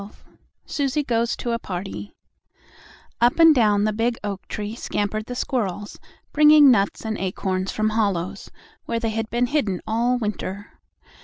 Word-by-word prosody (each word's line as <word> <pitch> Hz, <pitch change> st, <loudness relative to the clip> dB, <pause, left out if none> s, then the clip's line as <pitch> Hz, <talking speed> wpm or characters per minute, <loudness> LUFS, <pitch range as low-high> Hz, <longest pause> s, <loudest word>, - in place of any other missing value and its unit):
XII 200 Hz, -, -9 dB, 0.6 s
SUSIE 285 Hz, +1 st, -1 dB
GOES 235 Hz, -2 st, 0 dB
TO 240 Hz, -, -4 dB
A 230 Hz, -, -1 dB
PARTY 180 Hz, -, -6 dB, 1.1 s
Up 240 Hz, +1 st, +4 dB
and 325 Hz, -1 st, +8 dB
down 210 Hz, -6 st, +3 dB
the 215 Hz, 0 st, +1 dB
big 230 Hz, +2 st, 0 dB
oak 200 Hz, -2 st, -5 dB
tree 210 Hz, 0 st, -5 dB
scampered 215 Hz, -1 st, -3 dB
the 245 Hz, -, -5 dB
squirrels, 210 Hz, -6 st, -3 dB, 0.3 s
bringing 300 Hz, -2 st, +7 dB
nuts 200 Hz, -1 st, +1 dB
and 220 Hz, -1 st, -3 dB
acorns 185 Hz, 0 st, -2 dB
from 215 Hz, 0 st, 0 dB
hollows, 200 Hz, -5 st, -2 dB, 0.4 s
where 230 Hz, 0 st, -2 dB
they 225 Hz, -1 st, -1 dB
had 225 Hz, 0 st, -3 dB
been 240 Hz, +1 st, +1 dB
hidden 230 Hz, -, -1 dB
all 235 Hz, +3 st, +1 dB
winter. 205 Hz, -3 st, -5 dB
220 Hz, 155 wpm, -23 LUFS, 200-245 Hz, 1.1 s, and